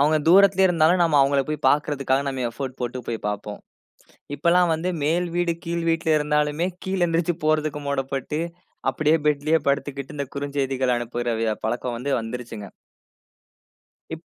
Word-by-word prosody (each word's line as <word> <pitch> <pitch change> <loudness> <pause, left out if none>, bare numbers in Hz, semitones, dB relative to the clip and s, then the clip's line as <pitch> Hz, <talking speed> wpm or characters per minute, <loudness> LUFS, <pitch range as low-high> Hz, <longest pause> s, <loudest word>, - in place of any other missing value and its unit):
அவுங்க 150 +2 +4
தூரத்திலேயே 190 +1 +6
இருந்தாலும் 170 +1 +3
நம்ம 160 -3 +3
அவுங்கள 140 0 +3
போய் 155 -1 -4
பாக்கிறதுக்காக 140 -2 +1
நம்ம 130 -2 -3
எஃபோர்ட் 130 +2 -6
போட்டு 125 +1 -3
போய் 115 - -2
பார்ப்போம். 105 0 -5 0.8
இப்பல்லாம் 175 +2 +3
வந்து 165 +3 -2
மேல் 170 +4 +1
வீடு, 175 -1 +1
கீழ் 170 0 -2
வீட்ல 165 0 +1
இருந்தாலுமே 150 +3 0 0.2
கீழே 190 -1 -1
எழுந்திரிச்சு 165 0 0
போறதுக்கு 155 -1 +1
மூடப்பட்டு, 135 +2 -2 0.5
அப்பிடியே 155 +3 +2
பெட்லேயே 150 +2 +2
படுத்துக்கிட்டு 140 +1 -3
இந்த 140 - -2
குறுஞ்செய்திகள் 135 -3 -1
அனுப்புற 120 0 -2
விய 110 -1 +1
பழக்கம் 120 +2 -2
வந்து 135 +4 -3
வந்துருச்சுங்க. 115 -3 -7 1.4
இப். - - -6
145 Hz, 140 wpm, -23 LUFS, 130-165 Hz, 1.4 s, தூரத்திலேயே